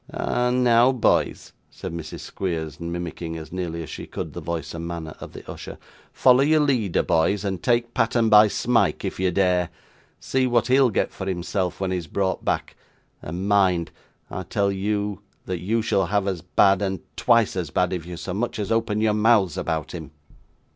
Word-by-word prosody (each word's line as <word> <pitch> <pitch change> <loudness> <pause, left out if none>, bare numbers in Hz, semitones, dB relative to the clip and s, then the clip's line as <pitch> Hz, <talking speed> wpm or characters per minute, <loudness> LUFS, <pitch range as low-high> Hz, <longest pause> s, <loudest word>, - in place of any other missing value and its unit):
'Ah! 125 0 0
Now, 125 0 +4
boys,' 125 -3 +1 0.2
said - - -7
Mrs. 80 -2 -6
Squeers, 80 -5 -4
mimicking, 85 -1 -5
as 80 -1 -9
nearly 85 -2 -4
as 80 - -10
she - - -7
could, - - -6
the - - -6
voice 85 -1 -4
and 85 0 -5
manner 85 -2 -5
of - - -9
the - - -11
usher. - - -8 0.3
'Follow 130 0 +5
your 155 +2 +4
leader, 125 - +1
boys, 95 +4 +1
and 95 -3 -2
take 120 0 +1
pattern 115 0 +2
by 105 0 +7
Smike 120 +3 +1
if - - -4
you 95 0 +2
dare. 90 -1 +2 0.5
See 130 -1 0
what 120 -2 +2
he'll 130 0 +5
get 105 - 0
for 95 - -6
himself, 90 0 -2
when 95 -1 -1
he 95 - 0
is 85 -3 -6
brought 95 +3 -1
back; - - -2 0.5
and, 90 +5 -4
mind! 95 -4 +2 0.4
I 95 - -4
tell 100 +2 0
you 100 0 -2 0.2
that 90 -2 -3
you 110 +6 0
shall 100 -5 +1
have 100 +1 0
as 95 -4 -2
bad, 100 +3 +3
and 95 -3 -2
twice 115 -4 +3
as 90 -5 -2
bad, 90 +7 +1
if 90 -3 -3
you 85 0 -8
so 90 +1 -5
much 120 +5 -2
as 105 -1 -3
open 115 -2 +1
your 110 -1 +3
mouths 105 -5 +3
about 80 -3 -2
him. - - -7
95 Hz, 195 wpm, -24 LUFS, 85-115 Hz, 0.5 s, by